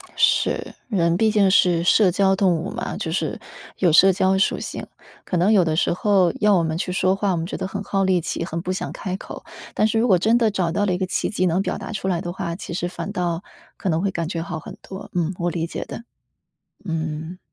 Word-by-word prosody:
是。 - - +1
人 170 -6 +2
毕 220 0 +3
竟 200 -3 +4
是 175 -3 +4
社 185 +1 +5
交 195 +1 +3
动 190 -1 +3
物 165 +4 -3
嘛， - - -4
就 - - -3
是 - - -2 0.4
有 180 -3 +3
社 190 +3 +7
交 190 0 +2
属 195 - +1
性。 - - -6 0.4
可 180 - -1
能 190 +6 +4
有 195 -4 +5
的 160 -2 0
时 165 - +2
候 185 -2 +2
要 210 -1 +5
我 170 - +2
们 160 0 -1
去 180 - -2
说 185 +1 +2
话， 200 -1 0
我 175 - 0
们 165 - -2
觉 - - -5
得 185 - -3
很 195 +1 -5
耗 195 0 0
力 185 -2 +3
气， 165 - -3
很 165 0 -4
不 185 +1 -2
想 190 - -4
开 185 -2 -4
口。 - - -9 0.3
但 215 - +2
是 225 +1 +1
如 240 - +2
果 185 -4 +5
真 225 +5 +3
的 225 -3 +2
找 180 -5 0
到 205 +4 +1
了 185 - +1
一 - - 0
个 185 - -1
契 - - -1
机 185 -3 0
能 180 +2 +2
表 - - -2
达 - - -7
出 195 -2 -3
来 175 -3 +1
的 175 -1 -5
话， 170 -2 -4
其 175 - -7
实 175 0 -2
反 195 - -6
倒 175 -2 -2 0.3
可 195 - -5
能 160 0 +1
会 195 0 0
感 170 -2 -3
觉 165 -1 -3
好 170 -2 -5
很 - - -10
多。 190 0 -9
嗯， 175 0 0
我 175 0 0
理 165 -1 -2
解 170 - -5
的。 - - -8 0.8
嗯。 160 +1 -4
185 Hz, 275 characters per minute, -22 LUFS, 170-195 Hz, 0.8 s, 社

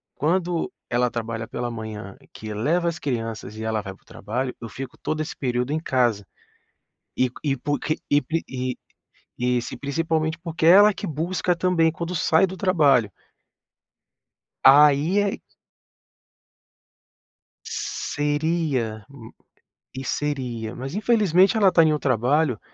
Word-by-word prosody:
quando 170 +2 0 0.2
ela 120 +1 +1
trabalha 115 -1 -4
pela 120 0 -4
manhã, 110 -3 -7 0.2
que 110 -1 -7
leva 165 +11 +1
as 170 -1 -6
crianças 115 -6 -4
e 110 - -6
ela 110 -1 -1
vai 95 -1 -7
para - - -29
o - - -34
trabalho, 125 +4 -4
eu 115 - -6
fico 130 +4 -8
todo 155 0 -3
esse 155 - -5
período 125 0 -1
em 155 - 0
casa, 120 -9 0 0.9
e 130 - +2
q 125 - -27
e 140 -2 0
porque 145 +3 -2
e 145 0 +4
pri 160 +5 -2
e 130 -1 -3 0.6
e 125 0 +1
se 120 - -7
principalmente 160 +2 -1
porque 165 -1 -2
ela 205 +5 +8
que - - -6
busca 175 +3 -1
também 170 -2 +2
quando 170 +2 -5
sai 160 +2 +3
do 190 - -7
trabalho. 150 - +3 1.5
Aí 150 +6 +6
é 205 -1 0 2.3
Seria 145 -7 -2
m 125 -5 -12 0.6
e 130 - -5
seria, 125 -6 -3
mas 135 +3 -6
infelizmente 205 -2 +3
ela 200 -3 +5
está 175 - +5
em 155 - +3
um - - +1
trabalho 130 0 +1
145 Hz, 145 wpm, -23 LUFS, 120-165 Hz, 2.3 s, ela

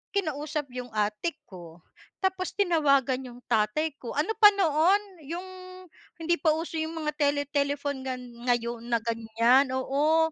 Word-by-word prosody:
kinausap 300 -5 -2
'yong 250 0 -6
ate 210 +10 -1
ko, 170 -3 -12 0.4
tapos 375 -1 -1
tinawagan 280 -9 +2
'yong 245 0 -12
tatay 230 +8 +1
ko. 240 - -6
Ano 305 +9 0
pa 425 - +10
noon, 365 +1 +3 0.3
'yong 350 +4 -5 0.7
hindi 345 +1 +2
pa 315 -3 +3
uso 325 0 -4
'yong 320 +1 -3
mga 300 - +1
tele 285 -1 +2
telephone 285 -1 -1
gan 255 -1 -4 0.3
ngayon 235 -1 -1
na 235 -1 +1
ganyan. 230 +3 +2
Oo. 305 +5 +2
285 Hz, 145 wpm, -27 LUFS, 240-320 Hz, 0.7 s, pa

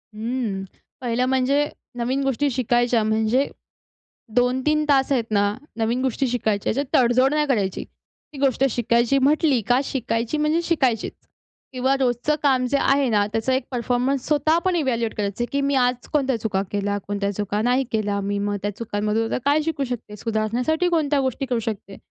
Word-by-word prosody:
हं. 220 -3 -3 0.4
पहिलं 245 0 0
म्हणजे, 265 +3 +2 0.3
नवीन 255 +3 -1
गोष्टी 270 +2 +1
शिकायच्या 240 -1 +1
म्हणजे, 220 +5 +1 0.9
2-3 260 +5 +2
तास 270 -1 +3
आहेत 255 -4 +2
ना, 205 -1 +2 0.2
नवीन 230 +2 0
गोष्टी 265 +1 0
शिकायच्या 220 -4 0
ह्याच्यात 280 +2 -1
तडजोड 255 +2 +4
नाही 300 0 +2
करायची. 205 -8 0 0.5
ती - - -9
गोष्ट 270 -2 +2
शिकायची 235 +3 +2
म्हटली 285 -2 +3
का 245 +1 +4
शिकायची 240 0 -2
म्हणजे 305 +3 +1
शिकायचीच. 265 -10 0 0.6
किंवा 260 +2 +1
रोजचं 255 +3 +1
काम 260 -3 +3
जे 285 - +3
आहे 275 0 +3
ना 205 -2 +2
त्याचा 225 +4 0
एक 260 - +1
परफॉर्मन्स 250 +2 0
स्वतः 305 +2 +2
पण 370 -1 +2
इव्हॅल्युएट 235 -8 0
करायचं, 210 +3 -2
की 280 - 0
मी 280 0 +1
आज 250 -1 +1
कोणत्या 270 -4 +1
चुका 195 -3 0
केल्या, 205 0 -1
कोणत्या 200 0 -1
चुका 205 +1 -1
नाही 250 +3 +2
केल्या. 205 -2 0
मी 200 +1 -2
मग 205 0 -1
त्या 205 - -2
चुकांमधून 215 0 -1
काय 290 +2 +3
शिकू 310 -3 -2
शकते? 215 -4 -5
सुधारण्यासाठी 230 - 0
कोणत्या 300 -4 +1
गोष्टी 260 +1 -2
करू 245 -2 -1
शकते? 210 -3 -5
245 Hz, 165 wpm, -23 LUFS, 220-275 Hz, 0.9 s, तडजोड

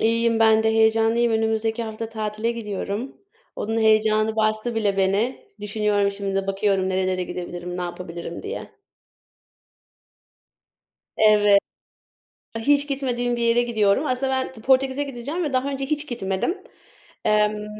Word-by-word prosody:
İyiyim 230 0 +2
ben 220 -1 +5
de, 220 - +2
heyecanlıyım. 225 +1 +3
Önümüzdeki 220 +1 0
hafta 220 0 -5
tatile 215 0 -2
gidiyorum. 210 +2 -5 0.4
Onun 225 +2 -2
heyecanı 215 0 +3
bastı 215 +2 0
bile 205 -3 0
beni. 205 - 0
Düşünüyorum 205 -1 0
şimdi 200 -1 -4
de 195 0 -1
bakıyorum 195 -1 +1
nerelere 185 -1 0
gidebilirim, 175 0 -6
ne 180 - -3
yapabilirim 170 -1 -6
diye. 445 +4 -6 2.5
Evet. 210 -2 +5 1.0
Hiç 285 +5 +2
gitmediğim 245 -3 -1
bir 235 - -3
yere 235 +1 +3
gidiyorum. 225 +2 +1
Aslında 265 0 0
ben 260 0 -1
Portekiz'e 265 +2 +2
gideceğim 280 +5 -4
ve 295 - -2
daha 260 +1 0
önce 270 -1 -3
hiç 300 +1 -2
gitmedim. 220 - -2 0.7
Emm 210 0 +1
220 Hz, 130 wpm, -23 LUFS, 205-240 Hz, 2.5 s, ben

